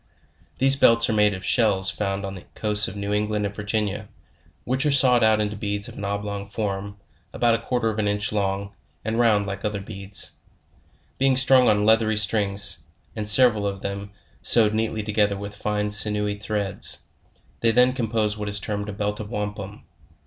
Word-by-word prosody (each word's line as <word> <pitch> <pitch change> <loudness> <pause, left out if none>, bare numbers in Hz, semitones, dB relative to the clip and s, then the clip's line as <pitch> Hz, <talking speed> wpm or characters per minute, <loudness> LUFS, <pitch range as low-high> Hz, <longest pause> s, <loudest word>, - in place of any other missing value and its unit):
These 135 +1 +5
belts 115 -3 +5
are - - -1
made 105 -2 +2
of 95 - -9
shells 100 -5 +1
found 100 -1 -4
on 95 - -6
the 95 - -11
coasts 105 -1 +2
of 95 - -8
New 100 0 -4
England 105 0 -1
and 100 - -4
Virginia, 105 0 -3 0.5
which 130 +2 -1
are 150 - +1
sawed 130 -4 +4
out 110 -1 +3
into 105 0 -2
beads 100 0 -3
of - - -10
an - - -8
oblong 100 0 -4
form, 100 -1 -5 0.4
about 120 -1 +1
a 115 - -2
quarter 125 -3 -2
of 110 -1 -3
an 105 - 0
inch 105 0 -1
long, 100 -1 -3 0.3
and 110 +1 -2
round 110 -4 +2
like 100 -1 -7
other 105 -2 -3
beads. 100 -1 -2 0.9
Being 135 -1 +2
strung 130 -1 +5
on 105 -1 +1
leather 110 -1 +2
strings, 100 -3 +1 0.4
and 105 -2 -1
several 110 -3 +6
of 100 -1 -5
them 100 0 -5 0.3
sewed 110 -3 +5
neatly 110 0 -2
together 105 -1 0
with 100 0 -8
fine 105 0 -3
sinewy 105 -1 +4
threads, 105 -1 -1 0.6
they 115 - +1
then 125 +2 +3
compose 110 -4 -2
what 105 0 -4
is 100 0 -3
termed 105 +1 -5
a - - -6
belt 105 0 -3
of 105 -1 -7
wampum. 105 -2 -6
105 Hz, 185 wpm, -23 LUFS, 100-110 Hz, 0.9 s, several